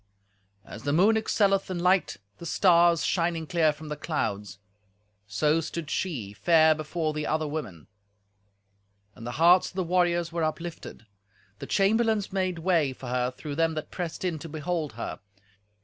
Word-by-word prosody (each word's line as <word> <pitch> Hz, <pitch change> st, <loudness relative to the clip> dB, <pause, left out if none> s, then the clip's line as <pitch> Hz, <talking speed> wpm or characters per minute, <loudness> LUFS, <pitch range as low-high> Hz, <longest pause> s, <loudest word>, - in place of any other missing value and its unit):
As -, -, -10 dB
the 145 Hz, +1 st, -1 dB
moon 200 Hz, +8 st, +4 dB
excelleth 200 Hz, -3 st, +1 dB
in 185 Hz, -, -3 dB
light 180 Hz, -, +2 dB, 0.2 s
the 170 Hz, -, -8 dB
stars 170 Hz, -2 st, +4 dB
shining 170 Hz, -2 st, 0 dB
clear 160 Hz, -1 st, +2 dB
from 150 Hz, +1 st, -10 dB
the 150 Hz, -, -3 dB
clouds, 105 Hz, -, -3 dB, 0.7 s
so 150 Hz, +11 st, +1 dB
stood 165 Hz, -1 st, -6 dB
she, 125 Hz, -, -3 dB
fair 160 Hz, -, +4 dB
before 155 Hz, +1 st, -3 dB
the 150 Hz, 0 st, -3 dB
other 155 Hz, 0 st, 0 dB
women, 105 Hz, -, -6 dB, 1.3 s
and 115 Hz, -, -10 dB
the 120 Hz, -, -4 dB
hearts 175 Hz, +3 st, +5 dB
of -, -, -19 dB
the 190 Hz, -, 0 dB
warriors 175 Hz, -1 st, +1 dB
were 170 Hz, -1 st, -2 dB
uplifted. 160 Hz, -6 st, -5 dB, 0.5 s
The -, -, -7 dB
chamberlains 215 Hz, 0 st, +1 dB
made 185 Hz, -2 st, -1 dB
way 165 Hz, -5 st, +1 dB
for 130 Hz, -1 st, -9 dB
her 125 Hz, 0 st, 0 dB
through 145 Hz, +3 st, -7 dB
them 165 Hz, -1 st, +1 dB
that 155 Hz, -, -6 dB
pressed 175 Hz, +1 st, -5 dB
in 170 Hz, -4 st, -2 dB
to 165 Hz, -, -8 dB
behold 155 Hz, -2 st, -3 dB
her. 115 Hz, -, -6 dB
165 Hz, 165 wpm, -27 LUFS, 150-180 Hz, 1.3 s, hearts